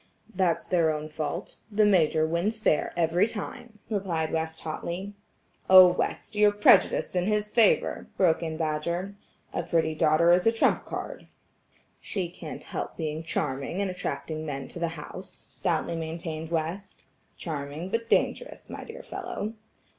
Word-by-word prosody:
"That's 180 -3 +1
their 170 -3 +2
own 155 0 -4
fault; 155 +4 -4
the 210 +1 +4
Major 160 -5 +4
wins 175 +7 -1
fair 185 -8 +2
every 170 +4 +3
time," 230 +1 -7
replied 180 -7 -1
West 160 0 -2
hotly. 175 +5 -5 0.6
"Oh, 185 -1 +10
West, 200 +4 -2
you're 210 0 +5
prejudiced 205 -2 +4
in 180 +1 +1
his 210 0 +1
favor," 225 -2 +3
broke 175 -4 +3
in 160 -1 -3
Badger. 170 +5 -2 0.4
"A - - 0
pretty 160 -2 +1
daughter 155 +2 +4
is 180 +4 +4
a - - +6
trump 225 - +2
card." - - -6 0.7
"She 180 -3 -3
can't 170 -2 -8
help - - -5
being 155 -1 -3
charming 150 0 -2
and 200 -2 0
attracting 160 -3 -4
men 140 -3 -4
to - - -8
the 170 - 0
house," 185 +5 -10
stoutly 170 0 -1
maintained 160 0 -5
West. 170 +4 -3 0.3
"Charming, 150 +2 -5
but 230 +1 -2
dangerous, - - 0
my - - -6
dear 455 - -9
fellow." 360 - -5
170 Hz, 150 wpm, -27 LUFS, 160-200 Hz, 0.7 s, Oh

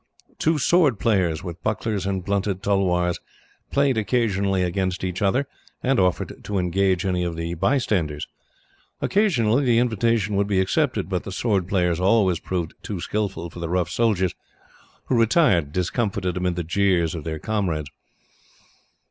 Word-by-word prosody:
Two 160 0 +2
sword 150 - +3
players, 95 -7 +1
with 85 -2 -7
bucklers 105 -2 -2
and 95 -2 -2
blunted 100 -1 -1
tulwars, 90 -3 +1 0.5
played 140 -4 +2
occasionally 100 -4 +1
against 95 +1 -1
each 90 +2 -3
other, 115 +8 +2 0.4
and 130 -2 +2
offered 90 -1 0
to 105 - -3
engage 95 +1 +1
any 90 -2 0
of 85 -1 -2
the 85 +1 -3
bystanders. 85 - 0 0.7
Occasionally 145 - +2
the 120 -3 +3
invitation 115 -3 +1
would 100 0 +1
be 100 -2 +1
accepted, 110 - +1
but 90 -2 -2
the 95 - -7
sword 95 -3 0
players 90 -3 +1
always 95 -2 +3
proved 85 -4 -3
too 100 -4 -5
skilful 90 -3 -3
for 85 - -10
the 85 -1 -4
rough 90 0 0
soldiers, 100 -6 +1 0.7
who 125 - +1
retired 115 - +3
discomfited, 95 - -1
amid 90 -1 -1
the 90 - -2
jeers 90 -1 +1
of 80 -3 -5
their 80 0 -4
comrades. 85 -7 -2
95 Hz, 150 wpm, -23 LUFS, 90-110 Hz, 0.7 s, sword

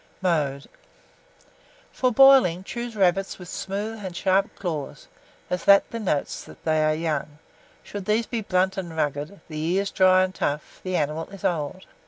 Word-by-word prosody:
Mode. 150 -7 0 1.3
For 255 -1 +1
boiling, 255 -9 +6
choose 235 +2 -6
rabbits 195 -1 +1
with 180 - -11
smooth 205 +3 -4
and 185 -2 -6
sharp 195 +3 +1
claws, 160 -7 -5 0.4
as 180 -1 -3
that 200 0 +6
denotes 205 -11 -2
they 155 -1 +2
are 155 0 +2
young: 155 -2 -3 0.5
should 200 -2 -7
these 215 +3 +1
be 230 0 -3
blunt 190 0 +1
and 170 -4 -5
rugged, 150 +5 -2
the 155 -3 -6
ears 185 +5 0
dry 185 0 +5
and 185 0 -2
tough, 150 -3 -3
the 185 -1 -3
animal 155 +1 -1
is 195 -1 -9
old. 170 +2 -2
185 Hz, 155 wpm, -24 LUFS, 155-200 Hz, 1.3 s, boiling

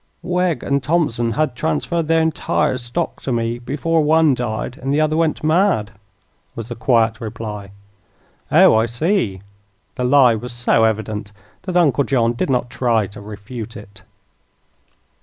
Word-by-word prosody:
"Wegg 180 -2 0
and 140 0 0
Thompson 130 -8 0
had 150 0 -1
transferred 165 +2 -1
their 165 0 +3
entire 155 -4 0
stock 120 0 -4
to 135 - -3
me 115 0 -1
before 155 +6 0
one 155 -1 +4
died 120 +1 -4
and 135 +1 -2
the 145 - +2
other 155 0 +1
went 160 -2 0
mad," 155 - +2 0.6
was 115 0 -7
the 120 - -5
quiet 115 -2 +1
reply. 105 -3 -6 0.8
"Oh, - - +6
I 110 +1 +3
see." 120 - -1 0.5
The 125 - -4
lie 125 -1 +5
was 120 +2 -5
so 120 -2 +2
evident 110 -1 -2 0.4
that 180 -1 0
Uncle 145 -5 +3
John 120 -4 +1
did 120 - -2
not 125 -2 0
try 115 -4 +1
to 100 +1 -11
refute 105 +2 -8
it. 100 -1 -13
125 Hz, 155 wpm, -19 LUFS, 110-155 Hz, 0.8 s, Oh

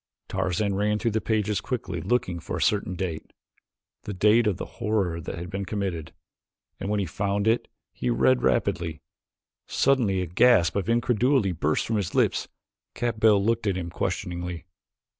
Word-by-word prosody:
Tarzan 95 +2 0
ran 105 +2 +1
through 115 +2 0
the 110 +1 0
pages 105 -2 0
quickly 95 -10 -3
looking 90 -5 0
for - - -5
a - - -4
certain 100 -3 +1
date 85 -3 -4 0.7
the 100 - -4
date 105 +5 +4
that 105 -4 +1
the - - -5 0.2
horror 105 -7 0
had 85 +3 -6
been 95 +1 -3
committed 95 -5 -3 0.7
and 95 - -4
when 105 0 +1
he 100 - 0
found 100 +4 -1
it 115 +2 +2 0.3
he 60 - -2
read 65 +1 +3
rapidly. 80 -2 0 0.7
Suddenly 120 -9 +2
a - - -1
gasp 90 -1 +4
of 100 +1 -1
incredulity 120 -1 +2
burst 80 -2 0
from 110 - 0
his 100 -5 -3
lips. - - +2 0.5
Capell 110 -4 +3
looked 115 -1 +1
at 95 -2 +1
him 85 -2 -4
questioningly. 85 0 -3
100 Hz, 160 wpm, -26 LUFS, 85-110 Hz, 0.7 s, date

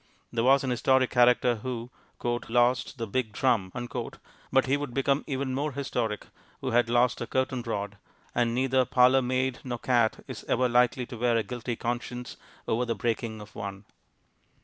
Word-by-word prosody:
There 115 -1 +1
was 135 +2 +5
an 130 - -1
historic 130 +1 +3
character 125 -1 +4
who 120 +1 -5 0.6
"lost 125 +3 +2
the 115 - -3
big 110 0 -2
drum," 115 -7 +1 0.8
but 135 0 +4
he 135 +1 +2
would 145 -4 -4
become 135 +1 +1
even 135 -2 -2
more 145 +2 -1
historic 120 -6 -2 0.3
who - - -3
had 120 0 +3
lost 120 +1 +2
a - - -3
curtain 130 -1 0
rod, 105 -3 -4 0.4
and 120 -1 +1
neither 130 0 +3
parlour 125 +2 +4
maid 130 0 0
nor 125 -2 -3
cat 120 -3 +1
is - - -7
ever 125 +1 +2
likely 125 +1 +2
to 120 - -9
wear 120 0 +2
a 115 - +1
guilty 120 +3 -4
conscience 120 +1 -4 0.3
over 115 +2 +1
the 120 -2 -1
breaking 115 -2 -2
of 105 - -12
one. 100 -1 -6
125 Hz, 170 wpm, -28 LUFS, 115-130 Hz, 0.8 s, was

